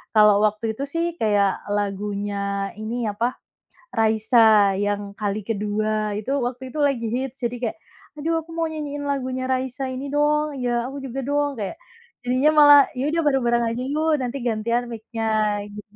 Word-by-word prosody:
kalau 210 Hz, -1 st, +6 dB
waktu 215 Hz, +1 st, 0 dB
itu 275 Hz, -, -4 dB
sih 330 Hz, +3 st, -1 dB
kayak 205 Hz, -3 st, +2 dB
lagunya 200 Hz, -1 st, -2 dB
ini, 230 Hz, +3 st, -3 dB
apa, 230 Hz, +4 st, -1 dB, 0.6 s
Raisa 220 Hz, -2 st, +4 dB
yang 205 Hz, 0 st, -2 dB
Kali 210 Hz, 0 st, -2 dB
Kedua, 215 Hz, 0 st, -1 dB
itu 210 Hz, +5 st, -4 dB
waktu 250 Hz, +1 st, -4 dB
itu 310 Hz, -, -6 dB
lagi 275 Hz, -5 st, +1 dB
hits, 260 Hz, +2 st, -4 dB
jadi 240 Hz, 0 st, -1 dB
kayak, 220 Hz, -, -4 dB, 0.4 s
"Aduh 330 Hz, +2 st, 0 dB
aku 330 Hz, -, -10 dB
mau 330 Hz, -1 st, -1 dB
nyanyiin 290 Hz, -2 st, -5 dB
lagunya 260 Hz, -1 st, -2 dB
Raisa 260 Hz, 0 st, -2 dB
ini 260 Hz, +2 st, -5 dB
dong," 300 Hz, 0 st, +2 dB
"Ya, 240 Hz, -1 st, 0 dB
aku 275 Hz, +1 st, -7 dB
juga 270 Hz, 0 st, -4 dB
dong." 285 Hz, -2 st, 0 dB
Kayak, 200 Hz, -3 st, -3 dB, 0.5 s
jadinya 255 Hz, +4 st, +3 dB
malah, 290 Hz, 0 st, +9 dB
"Ya 270 Hz, +4 st, -1 dB
udah 330 Hz, -, +1 dB
bareng-bareng 240 Hz, -4 st, +2 dB
aja 245 Hz, -, -3 dB
yuk, 305 Hz, +4 st, 0 dB
nanti 250 Hz, +2 st, -3 dB
gantian 235 Hz, +2 st, 0 dB
mic-nya." 220 Hz, -2 st, -1 dB
Gitu, 210 Hz, 0 st, -9 dB
235 Hz, 160 wpm, -23 LUFS, 210-270 Hz, 0.6 s, malah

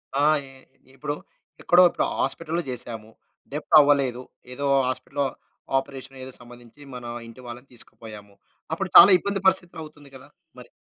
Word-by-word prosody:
ఆ! 145 Hz, +1 st, +2 dB
ఈ 135 Hz, -1 st, -11 dB, 0.5 s
ఇప్పుడు 145 Hz, +3 st, -4 dB, 0.5 s
ఎక్కడో 175 Hz, +1 st, +5 dB
ఇప్పుడు -, -, -1 dB
హాస్పిటల్‌లో 165 Hz, +1 st, -2 dB
చేసాము. 115 Hz, -3 st, -7 dB, 0.4 s
డెబ్ట్ 150 Hz, +1 st, -6 dB
అవ్వలేదు. 140 Hz, -4 st, +2 dB, 0.3 s
ఏదో 140 Hz, +2 st, -5 dB, 0.2 s
హాస్పిటల్‌లో 140 Hz, +2 st, -3 dB, 0.5 s
ఆపరేషన్ 135 Hz, 0 st, -6 dB
ఏదో 130 Hz, -, -9 dB
సంబంధించి 120 Hz, +2 st, -16 dB
మన 125 Hz, -1 st, -9 dB, 0.2 s
ఇంటి 115 Hz, +2 st, -13 dB
వాళ్ళని 120 Hz, +2 st, -10 dB
తీసుకుపోయాము. 105 Hz, -3 st, -11 dB, 0.4 s
అప్పుడు -, -, -3 dB
చాలా -, -, +11 dB
ఇబ్బంది 200 Hz, +2 st, -3 dB
పరిస్థితులు 185 Hz, -3 st, +1 dB
అవుతుంది 145 Hz, -2 st, -15 dB
కదా! 130 Hz, -, -14 dB, 0.3 s
మరి. -, -, -13 dB
135 Hz, 140 wpm, -24 LUFS, 120-150 Hz, 0.5 s, చాలా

